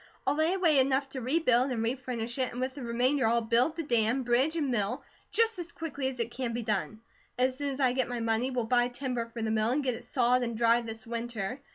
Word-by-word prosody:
I'll - - +3
lay 315 +5 +1
away 330 -7 +4
enough 270 +1 +2
to 265 -1 -6
rebuild 255 -1 +2
and 235 -3 -1
refurnish 240 0 -3
it, 255 - 0
and 245 - -6
with 260 +1 -2
the 280 - -8
remainder 245 +2 +1
I'll 235 +1 +3
build 235 +7 +2
the 330 - -3
dam, 240 -1 +2
bridge, 250 +6 +2
and 290 -5 0
mill, 225 +1 -1 0.3
just 450 -2 +2
as 340 -1 -5
quickly 285 -5 -4
as 260 -2 -5
it 235 0 -2
can 245 -2 -3
be 235 0 -3
done. 215 +1 -2 0.4
As 255 +1 +2
soon 285 +1 -2
as 275 0 -5
I 255 -3 +3
get 255 -1 0
my 245 -1 -3
money, 225 +2 0
we'll 250 -3 -1
buy 245 +1 +3
timber 245 -2 -3
for 230 -1 -6
the 220 - 0
mill 220 0 +2
and 280 +4 0
get 255 -2 0
it - - -8
sawed 250 0 +2
and 235 -2 -2
dried 235 0 +3
this 225 0 -7
winter. 235 0 -4
245 Hz, 250 wpm, -29 LUFS, 230-270 Hz, 0.4 s, away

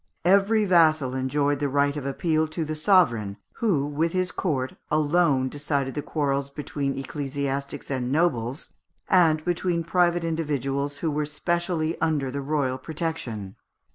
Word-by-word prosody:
Every 200 +4 +4
vassal 155 -7 +4
enjoyed 140 +2 0
the 145 -1 0
right 140 +1 +2
of 140 -2 -4
appeal 155 +3 0
to 155 +1 -3
the 155 - -3
sovereign, 130 - +3 0.2
who, 180 -12 +1
with 155 +3 -1
his 185 0 0
court, 130 -8 -2 0.2
alone 150 -3 +2
decided 140 -1 -2
the 145 - -3
quarrels 140 -2 -1
between 140 -1 -3
ecclesiastics 140 0 -4
and 130 -2 -1
nobles, 135 -5 0 0.3
and 160 -4 +4
between 175 -1 0
private 175 0 +2
individuals 145 -3 -2
who 160 - +1
were 150 0 -1
specially 165 +1 -1
under 150 -5 0
the 140 +1 -3
royal 135 -2 -1
protection. 130 - -4
150 Hz, 140 wpm, -25 LUFS, 135-165 Hz, 0.3 s, Every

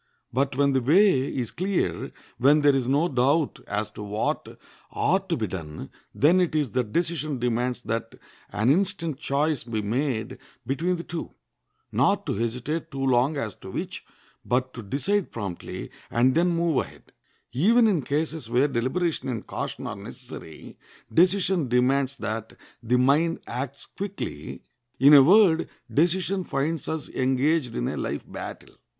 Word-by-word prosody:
But 135 +2 0
when 140 -1 +3
the 130 - +2
way 150 - +4
is 120 -4 -3
clear, 190 +1 -1 0.3
when 145 +4 +5
there 145 -1 +5
is 130 -3 0
no 145 +6 +3
doubt 140 +2 +1
as 105 +1 -2
to 105 - -9
what 105 +1 -3 0.3
ought 190 +1 +1
to 165 - +1
be 110 - -1
done, 80 -7 -7 0.2
then 170 +6 +4
it 175 -3 0
is 150 -5 +1
that 125 -4 -1
decision 155 -3 -1
demands 125 +1 -1
that 115 0 -3 0.4
an 110 +6 +2
instant 170 -4 0
choice 150 0 0
be 110 -2 -3
made 115 0 -2 0.3
between 160 +9 0
the 170 - -6
two—not 170 0 -3
to - - -1
hesitate 125 +8 -2
too 135 0 -3
long 130 +3 +2
as 110 -8 -3
to - - -10
which, - - -5 0.4
but 130 +1 0
to 120 - -7
decide 170 - -1
promptly, 100 -6 -6 0.2
and 125 +2 +3
then 170 +3 +3
move 170 -3 +1
ahead. - - -16 0.4
Even 225 - +4
in 195 -8 +3
cases 150 -1 -2
where 125 +4 +3
deliberation 135 +5 -1
and 115 -4 -4
caution - - -5
are - - -4
necessary, 80 -1 -10 0.3
decision 185 -2 +3
demands 130 +3 +2
that 110 -1 -4 0.3
the 120 +2 +2
mind 150 +6 +3
acts 135 +3 -5
quickly. 200 0 -6 0.4
In 140 +3 +7
a 140 - +11
word, 170 +1 +5 0.2
decision 185 +4 +2
finds 150 +1 -2
us 160 -2 -3
engaged 135 +2 +1
in - - -1
a - - -3
life - - -3
battle. - - -8
140 Hz, 155 wpm, -25 LUFS, 120-165 Hz, 0.4 s, a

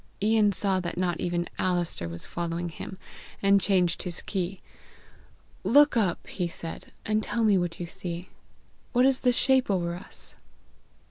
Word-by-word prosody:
Ian 215 0 +4
saw 195 -1 +1
that 175 -1 -4
not 175 -2 0
even 175 0 -1
Alister 175 - 0
was 85 0 -4
following 170 0 -3
him, 175 +3 -8 0.5
and 200 0 +5
changed 180 -2 +2
his 180 -2 -5
key. 190 -1 -3 1.0
"Look 290 +2 +6
up," 200 -7 +1
he 180 -3 -2
said, 165 -1 -7
"and 215 0 +1
tell 230 +1 -1
me 210 -2 +5
what 175 -2 -1
you 175 - -3
see. 175 +1 -6 0.6
What 250 +1 +5
is 270 -1 +3
the 250 - +3
shape 260 0 +3
over 175 -3 +1
us?" 175 - -8
185 Hz, 155 wpm, -27 LUFS, 175-210 Hz, 1.0 s, Look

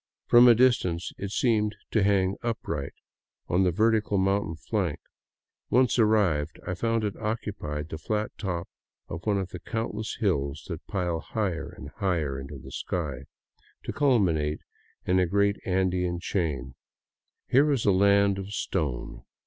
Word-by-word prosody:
From 120 +1 +7
a 120 - +8
distance, 115 -9 +2
it 100 - -3
seemed 105 -1 +1 0.2
to 110 - +3
hang 100 -1 +2
upright 110 -12 -3 0.5
on 90 - +2
the 95 - +4
vertical 110 +2 +2
mountain 95 -3 +1
flank; 85 0 -2 0.7
once 125 0 +3
arrived, 95 -9 +2
I 95 - -2
found 115 +4 0
it 105 -2 -2
occupied 100 -9 -3
the 80 - -6
flat 105 +5 -2
top 90 -4 -3 0.4
of 85 +1 -6
one 105 -2 +3
of 95 -2 -2
the 90 - -7
countless 110 +1 -3
hills 75 - -1
that 85 -2 -6
pile 90 -4 -1
higher 85 -4 -3
and 70 - -8
higher 80 -9 0
into 70 +2 -8
the 65 +1 -11
sky, 70 -5 -3 0.6
to - - -4
culminate 90 - +2 0.4
in 95 +1 +3
a 90 - +3
great 100 +2 +2
Andean 90 -2 +1
chain. 75 -8 -2 0.7
Here 140 +4 +4
was 140 -6 +1
a 100 - +5
land 100 +1 +4
of 95 +1 -6
stone. 70 -11 -3
95 Hz, 150 wpm, -27 LUFS, 80-105 Hz, 0.7 s, a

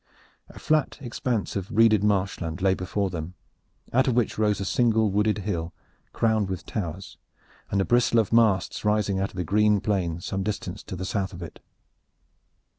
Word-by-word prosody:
A - - -14
flat 155 -2 +1
expanse 120 -4 -3
of 100 0 -3
reeded 110 -2 +4
marshland 95 -5 0
lay 95 0 +3
before 95 +1 -2
them, 85 +1 -6 0.6
out 130 +2 +3
of 125 - +2
which 120 -3 +1
rose 105 -2 +1
a 100 - -3
single 110 -2 +2
wooded 105 +1 +2
hill, 90 -5 -3 0.4
crowned 110 -3 +1
with 95 -2 -5
towers, 95 -1 -5 0.5
with 100 - 0
a - - +1
bristle 120 -1 +3
of 110 -1 +2
masts 110 -6 +2
rising 105 -2 +1
out 95 - -1
of - - -17
the 90 - -2
green 105 +4 +3
plain 95 -5 -1
some 95 +2 -3
distance 105 +1 -4
to - - -6
the 95 +1 -5
south 95 0 -2
of 90 0 -7
it. 80 - -10
100 Hz, 180 wpm, -25 LUFS, 95-110 Hz, 0.6 s, reeded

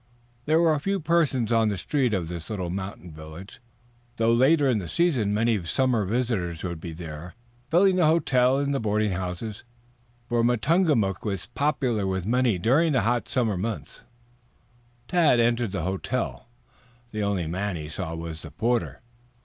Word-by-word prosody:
There 155 +2 +3
were 160 -3 +3
few 195 +6 -1
persons 150 - +1
on 115 -1 +3
the 100 - -2
streets 125 - 0
of 90 -4 -2
the 85 -1 -6
little 95 -5 -3
mountain 95 -2 -6
village, 80 +7 -11 0.6
though 115 0 +3
later 140 +5 +4
in 120 -5 +2
the 90 - -6
season 130 - +1
many 110 0 +1
summer 120 +3 +1
visitors 100 -7 -1
would 85 -3 -4
be 85 - -6
there, 80 +1 -8 0.3
filling 185 +2 +4
the 175 -4 +4
hotel 135 -5 +3
and 140 0 0
the 135 - 0
boarding 105 -1 0
houses, 95 +4 -4 0.6
for 120 -1 +1
Matungamook 120 - +2
was 100 -4 -3
popular 130 -8 0
with 95 -1 -2
many 120 -2 +2
during 145 - +3
the 130 - +3
hot 120 +3 0
months - - -12
of - - -6
summer. 110 -3 0 1.3
Tad 160 -8 +4
entered 120 -2 +2
the 100 -5 -3
hotel. 100 +6 -3 0.6
The 110 - -3
only 100 -4 0
man 95 +4 -2
he 75 -2 -6
saw 80 +1 -5
was 80 -1 -6
the - - -9
porter. 120 +2 -1
115 Hz, 165 wpm, -25 LUFS, 95-130 Hz, 1.3 s, later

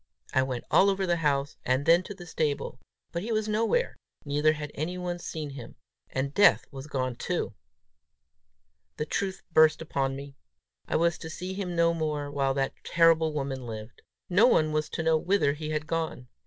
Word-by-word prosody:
I 130 - +4
went 130 -2 -2
all 200 - +6
over 195 -1 0
the 175 -1 +1
house, 145 -3 0
and 130 +3 +1
then 170 +2 +6
to 205 - -7
the 175 -2 -10
stable; 150 -6 -2 0.3
but 170 - -3
he 225 +4 -4
was 215 -1 0
nowhere, 230 - +1 0.3
neither 150 +2 +3
had 150 -1 -6
anyone 175 +3 -3
seen 155 -4 -5
him. 130 -4 -9 0.3
And 135 +1 -2
Death 205 - +5
was 135 0 -8
gone 130 -4 -2
too! 175 -6 -2 1.4
The 150 - -1
truth 190 +4 -2
burst 155 0 +6
upon 135 -4 -1
me: 140 0 -8 0.5
I - - -1
was 170 0 +2
to 160 - -7
see 180 +3 -5
him 185 -3 -4
no 170 0 +4
more 150 -3 -2
while 135 -1 0
that 135 -1 0
terrible 165 -1 +4
woman 135 -4 -3
lived! 110 0 -8 0.3
No 200 +7 +5
one 155 -10 +3
was 155 0 -1
to 160 - -3
know 160 0 +4
whither 180 -5 +2
he 155 +1 -5
had 155 0 -2
gone! 160 -6 -3
155 Hz, 185 wpm, -28 LUFS, 140-175 Hz, 1.4 s, all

